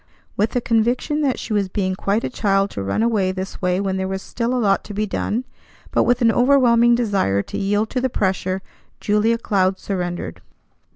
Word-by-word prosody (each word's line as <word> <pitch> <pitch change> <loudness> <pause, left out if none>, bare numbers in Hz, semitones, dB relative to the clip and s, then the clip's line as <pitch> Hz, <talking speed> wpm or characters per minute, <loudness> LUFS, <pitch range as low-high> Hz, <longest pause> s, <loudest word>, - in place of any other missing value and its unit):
With 215 +4 0
a 245 - +2
conviction 240 +6 +1
that 275 -4 +1
she 220 - -5
was 200 -2 +1
being 185 -1 -1
quite 200 +3 -1
a - - -1
child 195 -3 +1
to 100 - -5
run 95 - -1
away 210 -5 +1
this 190 +1 -6
way 180 0 +1
when 195 -1 -1
there 190 0 -2
was 190 0 -4
still 235 0 -2
a - - +1
lot 200 -5 +2
to 205 - -8
be 215 +1 0
done, 215 +3 -2 0.5
but - - +2
with 245 +1 +2
an 230 - +5
overwhelming 240 -2 +4
desire 195 - +1
to - - -6
yield 205 +2 0
to 255 - -1
the 260 - +1
pressure, 190 -3 -1 0.4
Julia 215 +2 +2
Cloud 190 -4 +1
surrendered. 175 - -4
205 Hz, 205 wpm, -21 LUFS, 190-235 Hz, 0.5 s, an